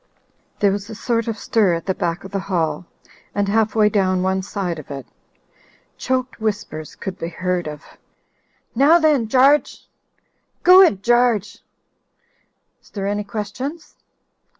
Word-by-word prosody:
There 200 -1 +4
was 200 +1 -4
a 220 - -7
sort 230 +1 -1
of 225 -1 -3
stir 205 -5 +1
at 165 - -6
the 190 - 0
back 170 +1 -3
of 195 - -10
the 200 - -2
hall 175 -2 -2 0.5
and 200 0 0
half 220 +2 +1
way 215 -1 +4
down 185 -3 +1
one 190 0 0
side 185 -3 -4
of 150 - -12
it. 135 -3 -7 0.9
Choked 255 -2 -3
whispers 205 -8 -4
could 190 - -7
be 165 - -3
heard 180 0 -2
of 150 0 -8 0.9
"Now 280 +8 +5
then, 300 -8 +2
Garge!" 270 +5 +3 0.4
— - - -47
"Go 365 +1 +8
it 205 - +3
Gargc! 240 -4 +2 1.2
Is - - -23
there 195 -2 -5
any 205 +1 -1
questions 220 +10 -6
205 Hz, 150 wpm, -20 LUFS, 185-235 Hz, 1.2 s, Go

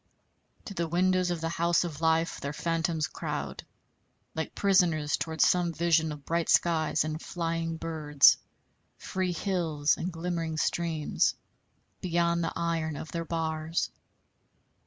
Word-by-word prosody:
To 200 - -6
the 170 -3 -1
windows 185 +2 +2
of 175 -2 -2
the 165 - -1
house 170 +1 +2
of 160 -3 -6
life 160 +1 +2
their 140 +1 -3
phantoms 165 -1 -1
crowd, - - -5 0.7
like 160 -1 -4
prisoners 170 -7 +3
toward 160 -1 -3
some 175 -1 +4
vision 160 -2 +2
of 150 -1 -9
bright 170 0 -1
skies 160 -3 +3
and 155 +1 -4
flying 165 -1 -3
birds, 155 -3 +4 0.6
free 185 -1 -2
hills 165 -5 0
and 180 - -3
glimmering 165 -1 -3
streams, 160 -2 0 0.7
beyond 170 -1 +1
the 165 - -2
iron 165 -2 -1
of 145 0 -7
their 165 +2 -3
bars. 160 0 -2
165 Hz, 135 wpm, -29 LUFS, 160-170 Hz, 0.7 s, some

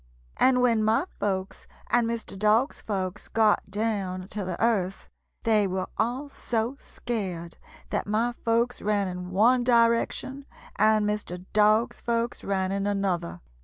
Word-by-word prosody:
"And 255 -1 +4
when 230 -3 +3
my 220 +9 +2
folks 190 -2 -3 0.2
and 240 -1 +3
Mr. 230 -3 -4
Dog's 215 +7 +2
folks 190 -1 -4
got 220 -3 +2
down 200 -3 -2
to 210 - -4
the 185 -2 -4
earth 200 -5 0 0.4
they 215 -3 +3
were 185 0 -2
all 250 +6 -1
so 235 -2 -2
scared 185 -8 -5 0.3
that - - -1
my 225 +3 +1
folks 235 +2 +1
ran 205 -1 +1
in 180 0 -5
one 235 +7 +4
direction 240 +3 +2 0.3
and 215 0 +3
Mr. 185 -4 -4
Dog's 215 +2 +3
folks 235 0 -1
ran 190 -1 -1
in 200 +1 -1
another. 185 - -1
215 Hz, 140 wpm, -26 LUFS, 190-230 Hz, 0.4 s, And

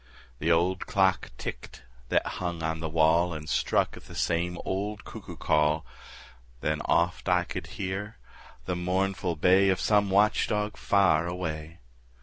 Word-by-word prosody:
The 80 +3 +1
old 90 +3 +1
clock 95 -1 +2
ticked 60 - -7 0.3
that - - +2
hung 85 -2 -4
on 80 0 -1
the 80 -1 -3
wall 80 +2 +3
And 75 0 -7
struck - - +1
'th - - -13
the - - -11
same 85 +1 0
old 100 +2 -3
cuckoo - - -9
call; 75 0 +2 0.8
Then 75 0 -1
oft 85 +2 +1
I 90 -1 +3
could - - -6
hear 100 +3 -4 0.5
the 90 - -2
mournful 90 0 -1
bay 95 +5 +4
Of 95 - +1
some 105 -2 +3
watch 100 +2 +3
dog 105 0 -1
far 95 -5 +3
away. 80 -3 -5
90 Hz, 150 wpm, -28 LUFS, 80-95 Hz, 0.8 s, bay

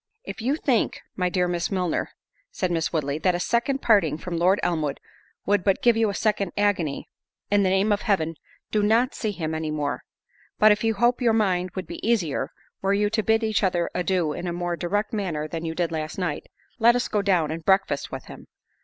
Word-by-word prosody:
"If - - -7
you 260 +6 +1
think, 260 -7 0 0.2
my 180 -1 0
dear 180 0 +1
Miss 175 -1 -1
Milner," 180 -4 -1 0.4
said 185 -2 -2
Miss 165 -1 0
Woodley, 150 -2 -1
"that 180 +1 +2
a - - -2
second 260 +7 0
parting 175 -10 +3
from 175 +1 -5
Lord 180 +4 +3
Elmwood 155 -5 -1 0.5
would 205 -2 +2
but 195 -2 +1
give 240 -2 +5
you 225 -1 +2
a 200 - -3
second 200 -4 0
agony, 185 -8 0 0.4
in 205 0 +4
the 190 - +2
name 195 +3 +2
of 205 - +1
Heaven 165 -7 0 0.4
do 210 - +2
not 230 +5 +3
see 220 - -2
him 160 -6 -3
any 160 0 -2
more—but, 150 +7 -1
if 210 +1 +1
you 225 -1 +1
hope 240 +4 +2
your 235 -2 +3
mind 185 -5 +1
would 185 - -4
be - - -8
easier, 180 -12 0 0.3
were 195 +1 +2
you 205 0 +1
to 220 - +1
bid 220 +2 +2
each 220 -1 +1
other 175 -4 0
adieu 180 -4 0
in 175 - -5
a 170 - -2
more 175 0 -2
direct 205 +6 -2
manner 170 -8 -2
than 165 +1 -5
you 160 0 -3
did 170 -1 -1
last 155 -1 -4
night, 175 -6 -3 0.3
let 235 +1 +6
us 245 - 0
go 210 - 0
down 180 -6 +1
and 165 +1 -5
breakfast 190 -6 +1
with - - -6
him. - - -12
190 Hz, 215 wpm, -25 LUFS, 170-215 Hz, 0.5 s, let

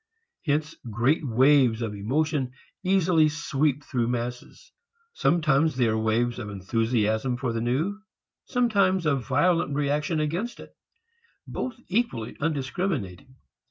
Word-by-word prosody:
Hence 155 +1 0 0.2
great 120 +9 +1
waves 130 -2 +4
of 110 -2 -3
emotion 130 +5 -1 0.3
easily 180 -4 +3
sweep 150 -1 -1
through 120 -4 -1
masses. 120 0 -5 0.4
Sometimes 160 - +2
they 125 -2 +2
are 110 - +1
waves 115 +2 0
of 110 -3 -5
enthusiasm 110 +4 0
for 120 -2 -2
the 115 - -2
new; 155 - -1 0.5
sometimes 200 -8 +2
of 140 -4 0
violent 145 +2 +2
reaction 150 +3 0
against 170 +11 -2
it - - -13 0.7
both 255 -3 -4
equally 185 - -1
undiscriminating. 135 - -3
140 Hz, 120 wpm, -26 LUFS, 120-160 Hz, 0.7 s, waves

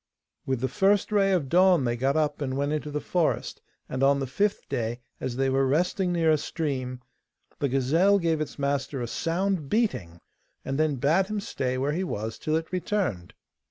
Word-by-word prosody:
With 130 -3 -1
the 130 - +1
first 195 - +2
ray 200 -2 +3
of 175 -7 +1
dawn 180 0 +4
they 120 -1 0
got 135 +5 +1
up 150 -1 0
and 130 -1 -2
went 145 +1 0
into 150 -1 -3
the 150 0 -2
forest, 170 +1 -1 0.3
and 130 - -4
on 140 +1 +4
the 135 - -1
fifth 200 +10 -1
day, 120 +1 -2 0.2
as 125 - -3
they 135 +1 +1
were 135 0 +2
resting 180 - +1
near 165 -2 +3
a 155 - +3
stream, 130 -7 -3 0.6
the 140 - 0
gazelle 160 +10 +3
gave 165 -4 0
its 155 - -5
master 140 -2 -1
a - - -3
sound 170 - -1
beating, 105 - -1 0.5
and 135 +2 -2
then 155 -2 +2
bade 160 +9 +2
him 215 0 -2
stay 130 -9 -2
where 140 +3 0
he 180 +4 -1
was 110 - -4
till 155 - -1
it 160 0 -2
returned. 180 - -2
150 Hz, 195 wpm, -26 LUFS, 130-180 Hz, 0.6 s, dawn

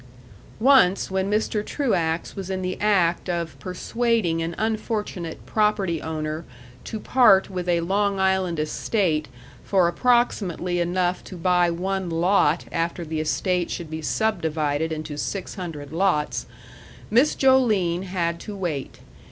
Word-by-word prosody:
Once, 220 -8 +4
when 190 +1 0
Mr. 210 0 0
Truax 175 - -1
was 195 -2 -6
in 190 -1 -2
the 185 0 -2
act 185 -4 +2
of 170 -2 -2
persuading 190 -2 0
an 165 +1 -3
unfortunate 215 -6 -3
property 210 -6 +1
owner 155 0 -4 0.4
to 220 - -5
part 200 -5 +4
with 180 -1 -3
a 170 -1 +2
Long 200 +3 0
Island 190 -3 +1
estate 155 +1 0 0.4
for 185 -3 +3
approximately 185 -5 +1
enough 180 +1 0
to 185 - -9
buy 180 0 +3
one 190 +2 -2
lot 165 -1 +2
after 170 0 -2
the 160 0 -3
estate 175 +3 0
should 165 -3 -5
be 160 0 -4
subdivided 160 -6 0
into 155 -1 -5
six 195 -2 -4
hundred 160 -7 -7
lots, 170 -4 0 0.6
Miss 250 +7 +4
Joline 215 -10 +3
had 170 -2 -2
to 210 - -7
wait. 160 -8 -4
180 Hz, 135 wpm, -24 LUFS, 165-205 Hz, 0.6 s, Once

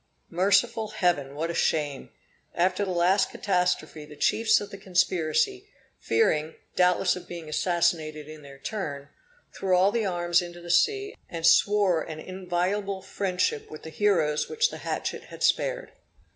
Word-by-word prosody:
Merciful 200 +5 +2
Heaven! 175 -10 0
what 165 +3 -3
shame! 145 -5 -1 0.5
After 185 +3 +1
the 195 - -3
last 180 +2 +2
catastrophe, 180 -5 -1
the 150 0 -12
chiefs 220 +9 +3
of 205 - -8
the 200 - -8
conspiracy, 185 - 0 0.3
fearing, 160 - +1 0.2
doubtless 180 0 +3
of 180 -1 -9
being 170 -2 -8
assassinated 155 -2 0
in 155 0 -10
their 140 -1 -13
turn, 140 -4 -5 0.4
threw 185 -2 +1
all 190 +2 +4
the 225 -2 0
arms 175 -1 +1
into 175 0 -8
the 170 0 -5
sea, 410 - +2
and 165 -1 -4
swore 200 -3 +4
an 155 -1 -7
inviolable 190 +2 -2
friendship 185 -6 -2
with 155 - -10
the 160 - -8
heroes 160 -7 +1
which 460 +1 +1
the - - -7
hatchet - - -4
had - - -8
spared. - - +1
180 Hz, 150 wpm, -26 LUFS, 160-200 Hz, 0.5 s, all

